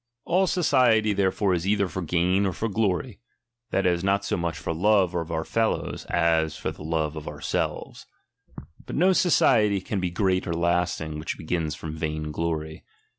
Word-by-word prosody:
All 185 +3 +2
society 125 - +3
therefore 95 0 +1
is 90 +1 -1
either 100 -1 +2
for 95 - -5
gain, 90 +4 +1
or 95 - -2
for 110 - -2
glory; 105 +1 -1 0.5
that 95 - 0
is, 90 -1 +1
not 100 +1 +1
so - - 0
much 85 -2 -2
for 80 - -3
love 95 +1 +3
of 85 -2 -2
onr 80 -1 -3
fellows, 115 -1 -1
as 80 -2 +1
for 80 - -3
the 80 - -13
love 80 -1 -1
of 75 - -7
ourselves. - - -4 0.8
But - - -5
no 185 +4 +4
society 115 - +3
can 95 +2 -3
be 90 -1 -1
great 95 0 0
or 85 - -1
lasting, 85 -2 -1
which 75 - -4
begins 80 -2 -2
from 80 -1 -7
vain 75 -1 -3
glory. 80 -1 -3
90 Hz, 180 wpm, -25 LUFS, 80-100 Hz, 0.8 s, no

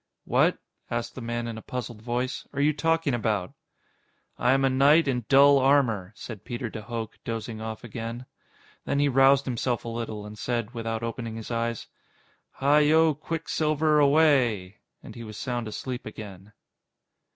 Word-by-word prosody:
"What," - - +3 0.3
asked 120 0 -3
the 130 - -8
man 120 0 -3
in 115 -1 -5
a - - -11
puzzled 120 -3 -6
voice, 125 +3 -3
"are 140 - -4
you 150 +2 +3
talking 165 -1 +1
about?" 105 -6 -1 0.9
"I 125 +1 +4
am 135 0 +2
a - - +5
knight 145 +4 +5
in 125 -4 -1
dull 140 +1 +7
armor," 130 -9 +2
said 110 -4 -9
Peter 120 -2 -5
de 110 - -6
Hooch, 115 0 -5
dozing 115 -1 -5
off 110 +1 -6
again. 115 +1 -6 0.6
Then - - -1
he 145 0 +3
roused 135 +1 +5
himself 120 -1 -2
a - - -3
little, 115 -3 -5
and 105 0 -10
said, 120 -1 -2
without 115 -1 -3
opening 115 -1 -4
his 115 +1 -7
eyes: 115 -1 -2 0.7
"Hi 145 +2 +3
yo, 155 +1 +4
Quicksilver, 155 0 0
away." 135 -10 +3 0.2
And - - -10
he 115 - -8
was 110 -1 -9
sound 120 -3 -3
asleep 120 +4 -5
again. 105 -2 -10
120 Hz, 165 wpm, -26 LUFS, 115-140 Hz, 0.9 s, dull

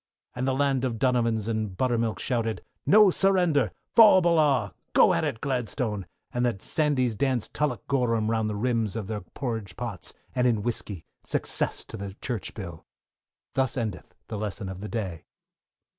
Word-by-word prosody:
And 125 +2 -1
the 130 - +1
land 135 -2 +1
of 120 -3 -1
donovans 115 -4 +1
and 110 -4 -2
buttermilk 115 -2 +1
shouted, 115 -3 -1 0.2
No 210 -1 +7
surrender, 180 - +3 0.3
faugh 220 -4 +9
o'ballagh! 150 - +3 0.2
go - - +6
it 145 -8 -1
Gladstone, 120 -6 -2 0.3
and 120 - 0
the 120 -3 +2
Sandys 130 +1 0
danced 125 +1 -1
tullochgorum 125 -6 0
round 110 -1 +1
the 105 - -3
rims 115 -1 0
of 110 -3 -3
their 105 0 -4
porridge 110 -2 -5
pots, 115 -6 -5 0.2
and 125 0 +2
in 110 -4 +1
whiskey, 105 -7 -3 0.2
success - - 0
to - - -8
the 100 -1 -6
Church 120 -2 -5
Bill. 85 -6 -7 0.7
Thus 135 0 0
endeth 110 -5 -4
the 105 - -4
lesson 100 -2 -4
for - - -4
the 100 +3 -7
day. 95 -8 -4
115 Hz, 160 wpm, -27 LUFS, 105-135 Hz, 0.7 s, faugh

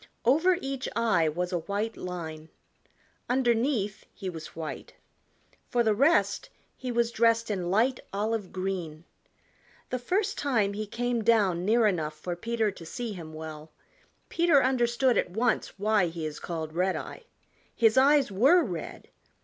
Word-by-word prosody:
Over 325 +9 +4
each 270 -1 -3
eye 215 -9 +2
was 180 +4 -3
a 175 - +1
white 205 +6 -3
line. 160 -3 -6 0.8
Underneath 240 -4 +1
he 190 -2 -6
was 160 -2 -9
white. 160 -1 -7 0.7
For 240 -1 +2
the 220 -2 +3
rest 280 +10 +2 0.3
he 255 -1 -5
was 235 0 +1
dressed 230 -1 +2
in 180 -4 -2
light 235 +7 +2
olive 210 -1 -2
green. 180 -5 -4 0.9
The 255 - -1
first 395 - -1
time 225 -8 +1
he 215 +1 -4
came 240 +1 -1
down 200 -6 +3
near 225 +2 +4
enough 160 -7 0
for 175 +3 -5
Peter 225 +3 -1
to 185 - -12
see 230 +6 -5
him 165 -4 -8
well 155 0 -8 0.6
Peter 335 -5 +3
understood 250 -1 +2
at - - -1
once 225 +4 -1
why 205 -2 +2
he 165 -1 -5
is 155 -1 -5
called 160 -2 -5
Redeye. 185 +3 -2 0.6
His 225 -2 +4
eyes 275 -2 +5
were 275 - +5
red. 175 - -6
215 Hz, 150 wpm, -28 LUFS, 175-245 Hz, 0.9 s, eyes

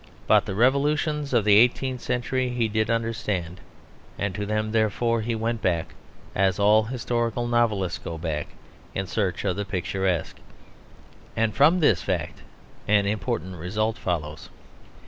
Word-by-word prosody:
But - - +4
the 95 - -3
revolutions 145 +4 +1
of 120 -5 +2
the 105 -1 +6
eighteenth 125 +2 +2
century 125 +1 -1
he 120 -2 0
did 110 +1 0
understand; 110 -7 -2 0.6
and 100 -1 -2
to 105 +1 -4
them 110 0 -1
therefore 115 +1 +1
he 115 +1 -2
went 115 0 -2
back, 85 -3 -1 0.4
as 95 -1 +2
all 105 +2 +4
historical 120 -1 -2
novelists 110 -7 +1
go 85 - -6
back, 80 -3 -3 0.5
in 95 - -1
search 95 0 -2
of 95 -1 0
the 100 - -1
picturesque. 95 -2 -2 1.0
And 110 -1 +1
from 150 - +5
this 105 - +4
fact - - -3 0.5
an 105 -1 +3
important 105 -3 -2
result 105 +6 -1
follows. 75 -4 -4
110 Hz, 145 wpm, -25 LUFS, 95-120 Hz, 1.0 s, the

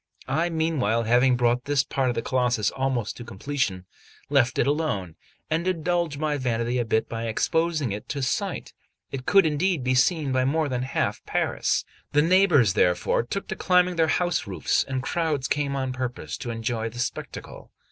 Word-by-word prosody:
I 160 +6 +1
meanwhile 155 -9 0
having 125 +3 +4
brought 120 0 +1
this 145 -1 +2
part 135 -2 -1
of 120 - -1
the 115 - -2
Colossus 125 -6 +1
almost 130 -5 -2
to 120 - -7
completion, 115 -4 -3 0.5
left 130 -3 +3
it - - +3
alone, 135 - -1 0.3
and 165 +3 -1
indulged 170 -3 0
my 150 0 -1
vanity 120 -1 -1
a 120 - 0
bit 110 0 +1
by 115 0 -4
exposing 155 +3 0
it 100 +1 -6
to 140 -2 -2
sight; 125 - -2 0.4
it 130 -2 -6
could, 195 -2 +6
indeed 160 0 +1
be 130 0 +1
seen 145 +2 +2
by 130 0 +2
more 155 +4 +1
than 125 -1 -1
half 130 - -2
Paris. - - 0 0.3
The 150 0 +4
neighbours, 165 - +4
therefore, 90 -1 +2
took 195 +12 -5
to - - -2
climbing 180 -1 +2
their 165 -1 +3
house 175 +2 0
roofs, - - +1
and 130 -1 -3
crowds 155 -6 -1
came 145 -1 -1
on 130 -1 -2
purpose 125 -1 -4
to 120 - -5
enjoy 115 0 -2
the 115 - -12
spectacle. 120 0 -6
130 Hz, 180 wpm, -25 LUFS, 120-160 Hz, 0.5 s, could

